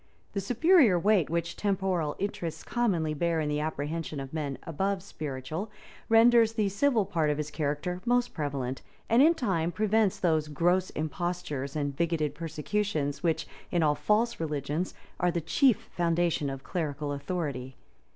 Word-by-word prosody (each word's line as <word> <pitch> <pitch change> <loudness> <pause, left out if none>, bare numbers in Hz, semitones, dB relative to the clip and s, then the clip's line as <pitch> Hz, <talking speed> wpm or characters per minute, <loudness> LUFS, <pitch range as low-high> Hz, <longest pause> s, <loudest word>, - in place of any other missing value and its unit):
The 200 - -1
superior 245 - +5
weight 195 -2 +3
which 170 +1 -2
temporal 190 -6 0
interests 170 -5 -4
commonly 180 -11 0
bear 165 +2 0
in 150 -1 -1
the 150 0 0
apprehensions 155 0 -3
of 135 +1 -7
men 145 -4 -3
above 190 +3 -1
spiritual, 155 +3 -5 0.4
renders 225 0 +6
the 215 -3 +1
civil 220 +1 +2
part 165 -6 0
of 150 - 0
his 150 0 -3
character 150 +4 -2
most 245 0 +1
prevalent; 135 -4 -3 0.3
and 230 +3 +5
in 325 +4 +6
time 185 - 0
prevents 215 0 +1
those 160 -4 +2
gross 175 +5 +1
impostures 155 -3 -3
and 145 -2 -2
bigoted 160 -2 0
persecutions 155 -1 -2
which, 165 -2 0 0.2
in 175 -2 +1
all 150 -1 +4
false 210 +11 +1
religions, 150 +2 -2 0.2
are 180 - +3
the 170 0 0
chief 230 - +2
foundation 170 -3 +1
of 135 0 -6
clerical 150 -4 -3
authority. 140 -4 -4
170 Hz, 150 wpm, -29 LUFS, 150-200 Hz, 0.4 s, renders